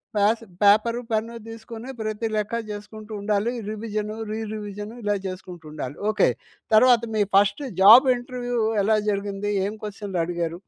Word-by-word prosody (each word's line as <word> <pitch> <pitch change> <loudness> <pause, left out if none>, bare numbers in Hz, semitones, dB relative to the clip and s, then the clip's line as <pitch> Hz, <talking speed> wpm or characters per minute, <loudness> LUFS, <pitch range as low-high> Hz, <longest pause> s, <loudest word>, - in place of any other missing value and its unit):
Pass 215 +3 +2 0.2
paper, 215 +4 +4
pen 225 +1 -1
తీసుకొని 225 +2 -9
ప్రతి 215 +1 -2
లెక్క 210 +1 -2 0.2
చేసుకుంటూ 210 +1 -9
ఉండాలి. 210 +2 0 0.2
రివిజన్, 215 -1 -4 0.2
రీ 215 - -3
రివిజన్ 210 0 -6
ఇలా 205 0 +1
చేసుకుంటూ 180 -3 -8
ఉండాలి. 145 -3 -6 0.2
ఓకే. - - +3 0.5
తర్వాత 245 +1 +6
మీ 215 - +2
ఫస్ట్ 200 +8 +3 0.2
జాబ్ 230 +7 +9
ఇంటర్వ్యూ 245 0 -4 0.3
ఎలా 215 +2 +3
జరిగింది? 200 0 -2
ఏం 205 - -3
క్వశ్చన్‌లు 205 -3 -4
అడిగారు? 170 -1 -3
210 Hz, 140 wpm, -24 LUFS, 200-225 Hz, 0.5 s, జాబ్